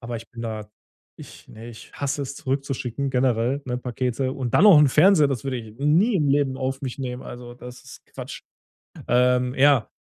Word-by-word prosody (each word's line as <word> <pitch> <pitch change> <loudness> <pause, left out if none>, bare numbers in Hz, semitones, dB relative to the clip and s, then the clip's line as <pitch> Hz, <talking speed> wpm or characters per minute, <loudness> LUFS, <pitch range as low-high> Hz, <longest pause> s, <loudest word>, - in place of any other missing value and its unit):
Aber 120 -1 -5
ich 115 0 -11
bin 115 - -9
da 110 -2 -6 0.5
ich - - -14
ne, 115 +2 -11
ich 115 - -13
hasse 140 0 -3
es 140 0 -6
zurückzuschicken 135 -1 -3
generell, 125 +1 0
ne, 125 -1 -2
Pakete. 125 +1 -2
Und 125 -3 -4
dann 180 - +5
noch 200 -7 +8
'n 150 -1 +5
Fernseher, 155 +3 +5
das 135 -4 -3
würde 135 -2 -2
ich 110 -1 -12
nie 165 - +2
im 150 -5 +1
Leben 140 -1 +1
auf 130 +1 -3
mich 130 -1 -5
nehmen. 125 -1 -5
Also, 120 0 -10
das 125 0 -12
ist - - -14
Quatsch. - - -9 0.7
Ähm, 125 +1 +2
ja. 140 -3 +3
130 Hz, 195 wpm, -23 LUFS, 120-140 Hz, 0.7 s, noch